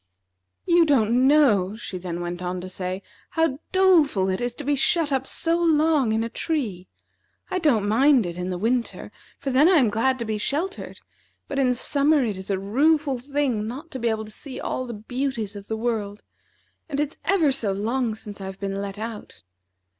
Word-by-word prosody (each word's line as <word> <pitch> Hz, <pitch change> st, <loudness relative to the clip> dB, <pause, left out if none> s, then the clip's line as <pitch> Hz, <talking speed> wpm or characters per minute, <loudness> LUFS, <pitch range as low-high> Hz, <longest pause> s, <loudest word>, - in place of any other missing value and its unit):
"You 345 Hz, -1 st, +5 dB
don't 255 Hz, -4 st, +3 dB
know," 220 Hz, -10 st, +4 dB
she 200 Hz, -5 st, -6 dB
then 175 Hz, -1 st, -5 dB
went 175 Hz, 0 st, -4 dB
on 180 Hz, 0 st, -3 dB
to 185 Hz, -, -7 dB
say, 185 Hz, +1 st, -4 dB, 0.3 s
"how 325 Hz, -4 st, 0 dB
doleful 330 Hz, -, +4 dB
it 190 Hz, +3 st, -1 dB
is 245 Hz, 0 st, -2 dB
to 295 Hz, -, -7 dB
be 290 Hz, +1 st, +1 dB
shut 305 Hz, +2 st, +2 dB
up 265 Hz, -1 st, 0 dB
so 335 Hz, +1 st, +1 dB
long 310 Hz, -6 st, +3 dB
in 220 Hz, +1 st, +1 dB
a -, -, -2 dB
tree. 225 Hz, -, -3 dB, 0.6 s
I 370 Hz, -, 0 dB
don't 240 Hz, -, +2 dB
mind 255 Hz, +2 st, +4 dB
it 170 Hz, -1 st, -5 dB
in 180 Hz, +1 st, -4 dB
the 180 Hz, -, -2 dB
winter, 235 Hz, +5 st, -1 dB, 0.3 s
for 275 Hz, -, -3 dB
then 280 Hz, +6 st, +5 dB
I -, -, +5 dB
am 250 Hz, -9 st, +4 dB
glad 255 Hz, +5 st, +1 dB
to 235 Hz, -, -4 dB
be 215 Hz, -1 st, -2 dB
sheltered, 335 Hz, -, -3 dB, 0.5 s
but 275 Hz, -, -3 dB
in 250 Hz, -2 st, +3 dB
summer 285 Hz, +2 st, +2 dB
it 210 Hz, -3 st, -2 dB
is 190 Hz, +1 st, -7 dB
a 195 Hz, -, +1 dB
rueful 275 Hz, +7 st, +1 dB
thing 260 Hz, -5 st, -1 dB
not 285 Hz, +8 st, -7 dB
to 260 Hz, -, -5 dB
be 235 Hz, -1 st, +1 dB
able 220 Hz, -1 st, -2 dB
to 215 Hz, -, -11 dB
see 260 Hz, +3 st, -7 dB
all 255 Hz, -, -3 dB
the 235 Hz, -, -6 dB
beauties 230 Hz, -1 st, -3 dB
of 200 Hz, 0 st, -9 dB
the 220 Hz, -, -3 dB
world. 220 Hz, -3 st, -3 dB, 0.7 s
And 285 Hz, -2 st, -2 dB
it's 295 Hz, +1 st, -2 dB
ever 340 Hz, -8 st, +3 dB
so 235 Hz, -7 st, -1 dB
long 225 Hz, +3 st, -1 dB
since 210 Hz, -2 st, -9 dB
I've 190 Hz, 0 st, -7 dB
been 195 Hz, 0 st, -3 dB
let 200 Hz, 0 st, -5 dB
out. 220 Hz, 0 st, -7 dB
240 Hz, 200 wpm, -24 LUFS, 205-290 Hz, 0.7 s, You